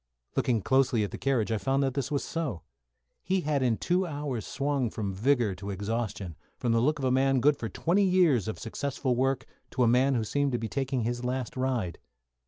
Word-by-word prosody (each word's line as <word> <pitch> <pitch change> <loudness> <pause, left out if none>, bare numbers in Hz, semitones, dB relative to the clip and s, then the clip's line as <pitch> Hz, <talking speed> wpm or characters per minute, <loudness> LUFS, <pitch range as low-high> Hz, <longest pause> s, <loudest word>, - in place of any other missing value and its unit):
Looking 115 -5 +1
closely 130 -3 +3
at 100 - -3
the - - -7
carriage 125 -5 +1
I 110 - 0
found 135 +3 +1
that 135 -2 0
this 140 -1 -2
was 145 -2 -1
so. 150 - -3 0.6
He 190 0 0
had 150 -3 0
in 120 -4 +2
two 180 +1 +1
hours 145 -7 -4
swung 140 -3 0
from 100 -3 -3
vigour 120 0 +2
to 100 +2 -7
exhaustion, 100 -3 -3 0.2
from 120 - 0
the 115 0 +3
look 150 +6 +2
of 135 - -3
a 130 - +2
man 135 +1 +3
good 145 +3 +4
for 115 -4 -5
twenty 170 - +1
years 175 - +3
of 110 - -3
successful 130 +2 -2
work 135 +1 0 0.2
to 125 - 0
a - - +4
man 130 +3 +4
who 115 - +1
seemed 140 +4 0
to - - +2
be 115 - -3
taking 130 0 -1
his 120 +2 -2
last 125 0 -2
ride. 125 -9 -1
130 Hz, 215 wpm, -28 LUFS, 115-140 Hz, 0.6 s, good